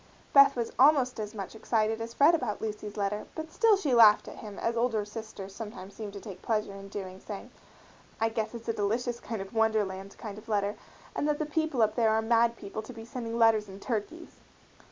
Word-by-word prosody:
Beth 275 Hz, 0 st, +8 dB
was 235 Hz, -2 st, -2 dB
almost 265 Hz, -3 st, +5 dB
as 215 Hz, +1 st, -5 dB
much 195 Hz, -3 st, -6 dB
excited 220 Hz, 0 st, 0 dB
as 230 Hz, +1 st, -6 dB
Fred 295 Hz, +4 st, +6 dB
about 250 Hz, -10 st, -1 dB
Lucy's 210 Hz, -1 st, -5 dB
letter, 205 Hz, +1 st, -2 dB
but 315 Hz, 0 st, -6 dB
still 450 Hz, -4 st, +4 dB
she 300 Hz, -9 st, 0 dB
laughed 220 Hz, -3 st, +7 dB
at -, -, -9 dB
him 210 Hz, -3 st, -9 dB
as 230 Hz, -, -1 dB
older 230 Hz, -3 st, +1 dB
sisters 210 Hz, -2 st, -8 dB
sometimes 200 Hz, -2 st, -8 dB
seem 210 Hz, +1 st, -6 dB
to 200 Hz, -, -8 dB
take 195 Hz, -2 st, -9 dB
pleasure 215 Hz, -3 st, -1 dB
in 195 Hz, 0 st, -9 dB
doing, 190 Hz, -2 st, -6 dB
saying, 200 Hz, 0 st, -8 dB, 0.7 s
"I 225 Hz, 0 st, +2 dB
guess 220 Hz, +1 st, -3 dB
it's 230 Hz, 0 st, -9 dB
a 230 Hz, -, +1 dB
delicious 230 Hz, +4 st, -1 dB, 0.3 s
wonderland 205 Hz, -4 st, 0 dB
kind 210 Hz, -2 st, -7 dB
of 215 Hz, -, -17 dB
a -, -, -6 dB
letter, 205 Hz, 0 st, +1 dB, 0.4 s
and 290 Hz, -, 0 dB
that 300 Hz, -1 st, +1 dB
the 310 Hz, -, -1 dB
people 300 Hz, -5 st, +1 dB
up 215 Hz, -1 st, +2 dB
there 225 Hz, -1 st, +3 dB
are 220 Hz, 0 st, +3 dB
mad 235 Hz, +1 st, +3 dB
people 215 Hz, 0 st, -6 dB
to 250 Hz, -, -10 dB
be 225 Hz, -1 st, -9 dB
sending 230 Hz, -1 st, -5 dB
letters 220 Hz, -3 st, +4 dB
in 190 Hz, +1 st, -10 dB
turkeys!" 260 Hz, +10 st, -4 dB
220 Hz, 215 wpm, -29 LUFS, 210-240 Hz, 0.7 s, Beth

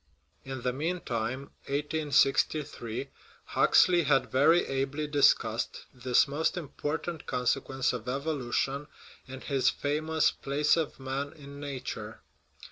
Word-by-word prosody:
In 135 Hz, -2 st, -6 dB
the 125 Hz, -, 0 dB
mean 165 Hz, +6 st, -2 dB
time 125 Hz, +4 st, -3 dB, 0.2 s
(1863) 140 Hz, -3 st, 0 dB, 0.3 s
Huxley 175 Hz, -1 st, +4 dB
had 135 Hz, -3 st, +2 dB
very 160 Hz, +6 st, +5 dB
ably 135 Hz, +3 st, -2 dB
discussed 145 Hz, -1 st, +2 dB
this 125 Hz, 0 st, +3 dB
most 150 Hz, +5 st, -1 dB
important 160 Hz, +1 st, -4 dB
consequence 130 Hz, +1 st, 0 dB
of 125 Hz, 0 st, -5 dB
evolution 140 Hz, 0 st, -1 dB, 0.4 s
in 130 Hz, 0 st, -8 dB
his 135 Hz, -3 st, +2 dB
famous 155 Hz, +2 st, +1 dB
Place 145 Hz, +2 st, +1 dB
of 160 Hz, -4 st, -2 dB
Man 135 Hz, +2 st, -3 dB
in 140 Hz, -2 st, -11 dB
Nature. 140 Hz, -3 st, -6 dB
140 Hz, 115 wpm, -29 LUFS, 130-150 Hz, 0.4 s, very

